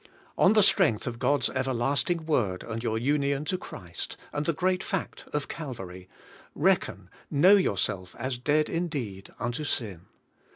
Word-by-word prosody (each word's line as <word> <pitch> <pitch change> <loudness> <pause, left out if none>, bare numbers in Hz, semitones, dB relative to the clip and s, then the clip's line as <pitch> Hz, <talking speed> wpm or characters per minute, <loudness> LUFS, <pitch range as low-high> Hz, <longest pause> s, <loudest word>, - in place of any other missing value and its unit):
On 190 - +5
the 215 -2 +6
strength 115 - +4
of 120 -1 -4
God's 145 +3 +2
everlasting 135 +6 0
Word, 110 - 0
and 115 0 -5
your 115 -2 -1
union 140 +3 +1
to 175 - 0
Christ, 90 - -6 0.2
and 145 +2 -2
the - - +4
great 185 +3 0
fact 195 -3 -4
of 150 -1 -2
Calvary, 95 - -7 0.5
reckon, - - +1 0.2
know 180 +8 +6
yourself 95 - 0
as 130 0 -3
dead 150 +4 +2
indeed 140 - -3
unto 120 +6 -3
sin. 105 - -2
135 Hz, 150 wpm, -28 LUFS, 115-155 Hz, 0.5 s, the